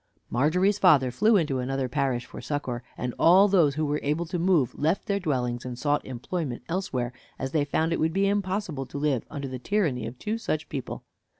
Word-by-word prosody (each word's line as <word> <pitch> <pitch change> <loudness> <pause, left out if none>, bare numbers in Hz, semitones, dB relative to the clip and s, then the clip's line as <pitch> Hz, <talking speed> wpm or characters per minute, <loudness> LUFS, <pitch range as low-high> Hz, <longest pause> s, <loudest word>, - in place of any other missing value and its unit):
Margery's 180 - +2
father 140 -9 +5
flew 215 - +4
into 150 -7 0
another 130 +1 -1
parish 130 -2 -1
for - - -9
succor, 130 -5 -3 0.2
and 125 -1 -3
all 185 +5 +7
those 170 -8 +3
who 155 0 0
were 150 +1 0
able 150 +4 -1
to 175 +1 -3
move 170 -7 +2
left 160 +6 0
their 200 -1 0
dwellings 125 -8 -1
and 125 -1 -6
sought 145 +3 0
employment 130 +1 -4
elsewhere, 130 -9 -2 0.2
as 135 0 -4
they 150 -2 +1
found 160 +3 0
it - - -1
would 160 +1 +2
be 195 +3 +2
impossible 190 -8 -1
to - - -7
live 140 -4 0
under 140 -2 -5
the 130 -1 -6
tyranny 145 - 0
of 120 +2 -8
two 215 - -3
such 155 -7 -2
people. 135 -4 -5
150 Hz, 205 wpm, -26 LUFS, 130-180 Hz, 0.2 s, all